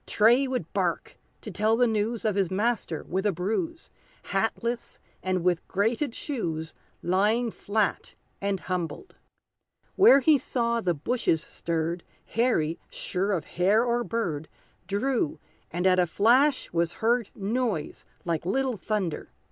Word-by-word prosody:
Tray 240 +6 +4
would 255 -1 -3
bark - - -2 0.2
to - - -7
tell 220 +1 +2
the 245 - +4
news 220 0 -1
Of 215 - +2
his 195 -3 +1
master 205 -5 -1
with 190 +2 -2
a - - +3
bruise, 220 - -3 0.4
Hatless, 230 +4 -1 0.2
and 185 -2 -1
with 180 -1 +1
grated 230 +6 0
shoes, 165 - -3 0.3
Lying 215 +6 +2
flat 210 0 -1 0.3
and 200 -1 -1
humbled! 185 - -4 0.8
Where 375 -8 +8
he 290 +1 +4
saw 235 -2 0
the 175 -5 0
bushes 165 - 0
stirred, 170 +1 -2 0.3
Harry, 220 -10 +1
sure 195 +3 -2
of 175 -7 -1
hare 200 +7 +2
or 240 0 +1
bird, 170 -11 -2 0.4
Drew, 210 - 0 0.3
and 175 +2 -2
at 185 -1 +5
a 180 - +3
flash 255 - +3
was 170 0 +1
heard 235 0 +1
Noise 215 -5 -2 0.2
like 165 -3 -1
little 250 +6 0
thunder. 190 -5 -2
210 Hz, 140 wpm, -27 LUFS, 180-240 Hz, 0.8 s, Where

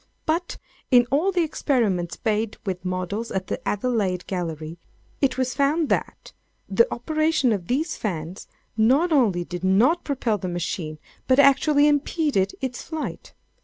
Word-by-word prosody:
But, 335 +3 -1 0.3
in 245 -1 +6
all 320 +8 +2
the 360 -2 +2
experiments 220 - 0
made 220 0 0
with 185 -2 -3
models 185 +5 -3
at 190 -1 -3
the - - -4
Adelaide 205 -5 -1
Gallery, 165 -3 -5 0.4
it 270 -2 +2
was 255 -1 0
found 295 +3 +1
that - - -2 0.3
the 470 +1 +3
operation 310 0 +1
of 180 -4 -4
these 305 +6 -1
fans 175 -3 -5 0.3
not 265 +11 +3
only 215 - +3
did 175 +1 -7
not 225 - +3
propel 245 -7 -1
the 185 - -4
machine, 170 -3 -3 0.3
but 260 - +4
actually 285 +1 +5
impeded 290 - +1
its 255 -2 -3
flight. 315 -2 -6
235 Hz, 145 wpm, -24 LUFS, 185-290 Hz, 0.4 s, in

